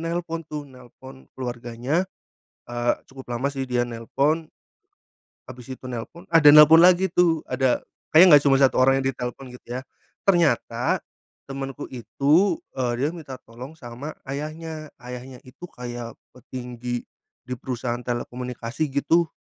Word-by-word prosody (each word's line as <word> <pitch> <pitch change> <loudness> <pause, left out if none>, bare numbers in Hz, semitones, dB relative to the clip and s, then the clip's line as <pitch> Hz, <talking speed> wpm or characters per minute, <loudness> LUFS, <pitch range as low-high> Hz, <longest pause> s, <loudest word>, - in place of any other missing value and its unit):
nelpon 165 0 -3
tuh, 150 -1 -5
nelpon 130 0 -15
keluarganya, 125 +7 -2 0.6
eee, 120 0 0
cukup 135 -1 -13
lama 140 +4 -1
sih 135 -1 -4
dia 120 -1 +1
nelpon, 140 +7 -1 1.0
habis 125 -2 -11
itu 130 0 -8
nelpon, 125 +7 -7
ada 150 -3 +9
nelpon 150 +2 +9
lagi 180 +1 +6
tuh, 165 -3 +3
ada, 130 -2 +1 0.3
kayaknya 165 +4 +8
enggak 145 - +5
cuma 135 - +6
1 135 -1 +4
orang 135 +1 +5
yang 135 - -3
ditelepon 125 +2 -6
gitu 125 - -14
ya, 125 +1 -3 0.5
ternyata 175 -5 +2 0.5
temanku 135 -1 -6
itu, 150 - +2 0.2
eee, 125 -2 -1
dia 140 +4 +1
minta 150 -6 -8
tolong 125 +6 -10
sama 125 +4 -8
ayahnya. 155 +3 -6
Ayahnya 125 +1 -9
itu 130 +7 -11
kayak 120 -1 -7 0.2
petinggi 125 -1 -6 0.4
di 125 - -3
perusahaan 120 -1 -3
telekomunikasi 125 +3 -4
gitu. 160 +4 +2
130 Hz, 135 wpm, -24 LUFS, 125-155 Hz, 1.0 s, ada